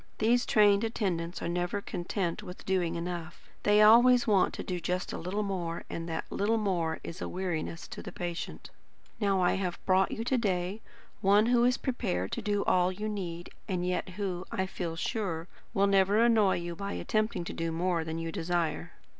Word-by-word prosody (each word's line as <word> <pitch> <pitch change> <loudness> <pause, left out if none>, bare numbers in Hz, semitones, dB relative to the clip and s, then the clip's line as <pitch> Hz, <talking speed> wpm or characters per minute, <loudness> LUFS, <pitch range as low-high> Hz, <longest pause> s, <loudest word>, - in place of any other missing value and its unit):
These 240 +3 +2
trained 205 -1 +5
attendants 180 -7 -2
are - - -1
never 175 +3 -1
content 180 0 -3
with 180 -3 -10
doing 180 -3 0
enough; 170 -1 -5
they 210 +1 +5
always 240 +3 +7
want 205 -4 +3
to - - -5
do 180 -1 -3
just 180 +1 -2
a - - -3
little 190 +5 -2
more, 175 -4 -3
and 165 0 -4
that 160 - -3
little 215 +3 +1
more 175 -6 0
is 170 +4 -7
a - - -3
weariness 170 -3 -3
to - - -7
the - - -8
patient. 175 -1 -5 0.5
Now 200 -3 +2
I 175 - +3
have 185 -3 -2
brought 190 0 +4
you 225 - -3
to 250 +2 +1
day 190 -1 -1 0.4
one 205 +1 +5
who 240 0 +4
is 250 +1 +3
prepared 240 -7 -2
to 235 - -3
do 205 -2 0
all 180 0 +3
you 210 +3 -4
need, 175 -5 -5 0.2
and 180 -3 -1
yet 180 +1 -1
who, 185 -3 -2
I 190 - 0
feel 175 -3 -4
sure, 170 -2 -2 0.2
will 200 -3 +3
never 195 +1 +4
annoy 225 -4 +4
you 170 0 -4
by 200 +2 -4
attempting 215 -5 -1 0.3
more 170 0 0
than 160 0 -4
you 165 0 -3
desire. 170 -1 -2
190 Hz, 190 wpm, -30 LUFS, 175-210 Hz, 0.5 s, always